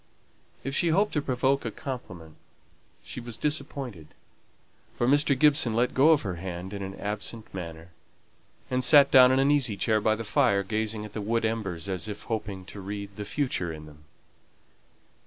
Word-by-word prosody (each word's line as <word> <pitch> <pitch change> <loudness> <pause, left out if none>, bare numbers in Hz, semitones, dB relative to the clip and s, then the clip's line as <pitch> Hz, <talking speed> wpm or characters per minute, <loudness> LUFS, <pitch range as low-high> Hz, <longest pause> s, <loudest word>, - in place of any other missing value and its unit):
If 135 +2 -3
she 170 - +2
hoped 195 +6 +2
to 150 - +1
provoke 135 +1 0
a - - -2
compliment 95 - -8 0.7
she - - -7
was 120 -2 -7
disappointed, 140 - -3 0.9
for 120 - +1
Mr. 145 0 +3
Gibson 140 -5 +4
let 120 +2 +1
go 155 +4 +6
her 95 -10 -5
hand 90 +2 -6
in 100 - -5
an 95 0 -6
absent 105 +2 -5
manner, 85 -2 -7 0.8
and 130 0 0
sate 140 +2 +7
down 130 -1 +8
in 130 - +3
an 135 +2 +3
easy 125 -8 +1
chair 110 0 +1
by 110 +1 +2
the 115 - -5
fire, 110 -4 +2
gazing 110 +1 -3
at 105 - -11
the 110 - -4
wood 115 +2 0
embers 100 -6 -3
as 95 0 -3
if 105 -1 -7
hoping 105 -4 -4
to 100 +1 -9
read 100 0 -6
the 105 - -6
future 105 - -1
in 75 -1 -9
them. 75 0 -16
110 Hz, 175 wpm, -27 LUFS, 95-135 Hz, 0.9 s, down